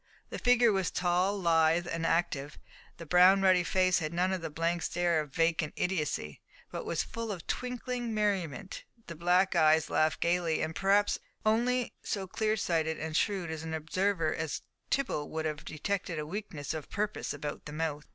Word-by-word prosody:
The - - -4
figure 245 -2 +5
was 190 -2 0
tall, 180 +3 +1
lithe, 165 -1 +3
and 165 -1 -2
active, 150 -4 0 0.4
the 165 - -8
brown 180 +4 +6
ruddy 185 -2 +5
face 185 0 +2
had 155 -2 -3
none 185 +2 +1
of 185 - -2
the 165 - -4
blank 165 +3 -1
stare 175 0 +1
of 150 - -8
vacant 165 0 +1
idiocy, 150 - -2 0.3
but - - -5
was - - 0
full 230 -1 -5
of 180 -5 -6
twinkling 250 -1 -3
merriment, 195 -5 -2 0.2
the 170 - -7
black 180 +3 +2
eyes 155 0 +4
laughed 155 0 +2
gaily, 170 -2 +1
and 160 0 -3
perhaps 200 +1 +2 0.3
only 240 +3 +2
so 195 -2 -3
clearsighted 180 -6 0
and 155 0 -4
shrewd 185 -3 0
an 160 0 -4
observer 165 +1 0
as 160 -2 -3 0.3
Tibble 250 - -1
would 160 0 -3
have 150 -1 -3
detected 175 +2 -3
a 150 - -3
weakness 165 -5 -5
of 155 -2 -6
purpose 210 0 -2
about 145 +1 -5
the 150 - -7
mouth. 150 -2 -3
175 Hz, 170 wpm, -30 LUFS, 160-195 Hz, 0.4 s, brown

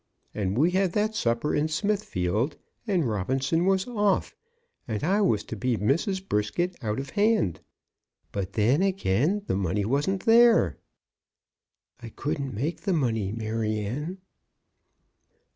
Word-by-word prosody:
And 100 0 -2
we 160 +6 +4
had 185 -1 +1
that 215 +1 +1
supper 115 - 0
in 150 - +1
Smithfield, 155 - -1 0.3
and 180 - +1
Robinson 135 - 0
was 190 -1 +2
off, 205 -5 0 0.5
and 110 -3 -3
I 195 +6 +2
was 110 - +2
to - - -7
be 120 +3 0
Mrs. 185 - 0
Brisket 175 - -1
out 105 +2 -1
of 135 0 -6
hand. 210 - +2 0.7
But 100 -1 -4
then, 120 - +3
again, 190 - +1
the - - -1
money 100 +1 0
wasn't 145 - 0
there." 230 - +5 1.2
"I 115 - -8
couldn't 140 0 -4
make 145 +11 -3
the 195 - 0
money, 115 - 0
Maryanne." 110 - -3
140 Hz, 130 wpm, -26 LUFS, -, 1.2 s, there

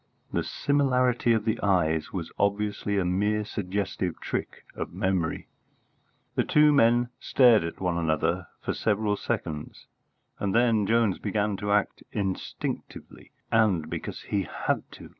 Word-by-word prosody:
The - - +1
similarity 125 -4 +2
of 110 -2 +2
the 110 0 0
eyes 80 -6 +1
was 85 -4 -5
obviously 100 0 0
a 95 - +1
mere 105 +4 +1
suggestive 95 -3 -3
trick - - -4
of - - -5
memory. 95 -4 -1 0.9
The - - +1
two 150 0 +5
men 120 -2 +4
stared 120 -7 +5
at 85 - -5
one 90 -2 0
another 80 +2 0
for - - -2
several 105 -1 0
seconds, 75 -6 -4 0.5
and 100 0 -1
then 115 -4 +3
Jones 115 -4 +2
began 105 0 -1
to 105 +1 -2
act 105 0 +1
instinctively, 95 -3 -5 0.2
and 100 -8 +2
because - - -5
he 100 - -1
had - - -2
to. - - -11
105 Hz, 140 wpm, -27 LUFS, 90-115 Hz, 0.9 s, two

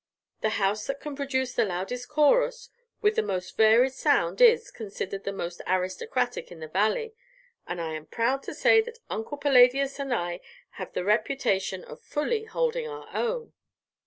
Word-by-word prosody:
The 220 - +2
house 205 +1 0
that 275 0 -3
can 295 -2 -6
produce 260 -2 -1
the - - +2
loudest 210 +6 -4
chorus, 480 +11 +2 0.3
with 420 0 +3
the - - +3
most 190 -4 -4
varied 225 +4 +5
sound, 265 - +1
is 475 0 +6
considered 195 -2 -6
the 200 - -1
most 175 -3 -5
aristocratic 185 - -1
in 170 - -10
the 155 - -7
Valley, 215 - 0 0.5
and 175 0 -4
I 160 -1 -3
am 155 0 -7
proud 245 - 0
to - - -7
say 445 - +5
that 475 +1 -9
Uncle 225 +7 -4
Palladius 275 0 +4
and 275 -1 -3
I 175 -6 -2 0.4
have - - -6
the - - -2
reputation 210 -4 0
of - - -11
fully 435 +9 -2
holding 480 +1 -1
our 445 0 -9
own." 475 -1 -2
250 Hz, 170 wpm, -27 LUFS, -, 0.5 s, is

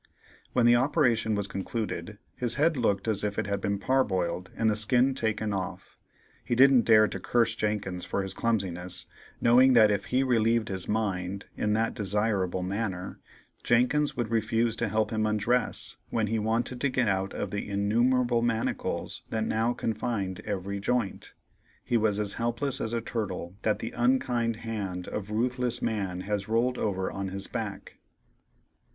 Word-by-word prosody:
When 125 -2 +3
the 120 0 +7
operation 120 -4 +2
was 100 -1 -1
concluded, 100 -1 -4 0.2
his 120 -1 0
head 160 +3 +3
looked 105 -5 0
as 105 -2 0
if 105 -1 -2
it - - 0
had 100 -1 -2
been 100 0 0
parboiled 95 -7 0
and 115 - +2
the 105 - +3
skin 125 +5 +3
taken 110 -4 -1
off. 95 -2 -5 0.5
He 120 - -1
didn't 130 -1 +6
dare 110 -1 +6
to - - -5
curse 115 -2 +2
Jenkins 100 -4 -2
for 100 - -2
his 95 -1 -4
clumsiness, 95 -6 -2 0.3
knowing 130 +3 +6
that 110 -3 +6
if 100 -1 -1
he 130 +1 +1
relieved 115 -3 +2
his 95 -2 -3
mind 100 -3 -2
in 105 - 0
that 115 +1 +1
desirable 100 -3 0
manner, 95 -1 -3 0.4
Jenkins 125 +5 +2
would 115 -2 -2
refuse 115 +1 +1
to - - 0
help 110 0 0
him 110 -1 0
undress 110 +4 0
when 110 -2 0
he 110 +2 -1
wanted 115 +3 -1
to 140 - +2
get 125 -2 +1
out 95 0 -1
of 100 - -3
the 100 0 -4
innumerable 120 +4 +2
manacles 115 -1 -2
that 110 -1 -1
now 110 +2 +1
confined 110 -5 -2
every 100 -1 -3
joint. 115 0 -2 0.5
He 120 - -1
was 105 -2 +1
as 105 -1 +1
helpless 120 +4 0
as 110 - -2
a 115 - 0
turtle 95 -6 -4
that 110 - +1
the 115 - -5
unkind 120 -2 +1
hand 100 -5 -5
of 105 -1 -5
ruthless 125 +2 -1
man 95 -5 -2
has 100 +1 -3
rolled 120 +3 +1
over 95 -3 -1
on 95 0 -4
his 95 +1 -2
back. - - -6
110 Hz, 170 wpm, -28 LUFS, 100-120 Hz, 0.5 s, the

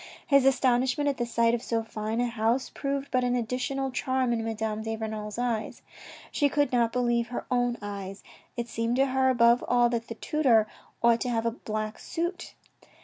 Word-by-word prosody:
His 275 -3 +4
astonishment 260 +1 +2
at 275 - -8
the 240 - -2
sight 230 0 +2
of 240 - 0
so 230 -1 -1
fine 220 +1 -3
a - - +2
house 235 +2 0
proved 275 0 -3
but 255 0 +2
an 245 0 +1
additional 255 +3 -2
charm 260 -1 0
in 225 -1 -1
Madame 220 -1 -2
de 225 0 -3
Renal's 215 -1 -5
eyes. 240 -3 -2 0.5
She 290 -1 +2
could 290 +1 +1
not 235 -2 +2
believe 240 -1 +1
her 245 - -5
own 245 -1 +1
eyes. 195 -1 -6 0.3
It 235 0 -2
seemed 230 +1 -1
to 270 +1 +4
her, 265 0 +2
above 235 -1 +4
all, 240 -1 +4
that 235 -1 -2
the 230 - -6
tutor 250 -6 +3 0.4
ought 235 0 +4
to 250 - -1
have 230 -1 0
a 230 - +2
black 215 -2 -5
suit. 345 +2 -4
240 Hz, 195 wpm, -27 LUFS, 225-260 Hz, 0.5 s, His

